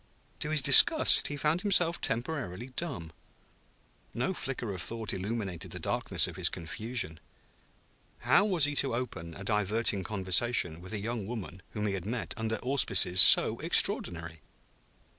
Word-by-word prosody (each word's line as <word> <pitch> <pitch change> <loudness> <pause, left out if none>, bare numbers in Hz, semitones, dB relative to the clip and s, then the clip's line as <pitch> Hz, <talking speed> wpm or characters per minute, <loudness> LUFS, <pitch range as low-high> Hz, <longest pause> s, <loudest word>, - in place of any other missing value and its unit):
To 150 - -4
his 155 -3 0
disgust 310 - +7
he 145 - -6
found 155 +5 -1
himself 180 -4 0
temporarily 120 - -5
dumb. 110 - -5 1.0
No 125 +10 -3
flicker 125 - -6
of 90 - -6
thought 115 0 -2
illuminated 95 -3 -6
the - - -8
darkness - - -1
of - - -9
his - - +2
confusion. 95 -1 -4 1.0
How - - +2
was 180 -8 +1
he 145 - -2
to 135 -4 0
open 85 -10 -7
a 95 - -10
diverting 105 0 -1
conversation 95 -3 -1
with 90 +3 -10
a 105 - -4
young 110 -1 -6
woman 100 -6 -8
whom 105 -1 -4
he 100 - -2
had 95 0 -6
met 115 +1 -5
under 110 0 -4
auspices 120 -8 +3
so - - +6
extraordinary? 85 -2 -1
110 Hz, 150 wpm, -28 LUFS, 95-135 Hz, 1.0 s, disgust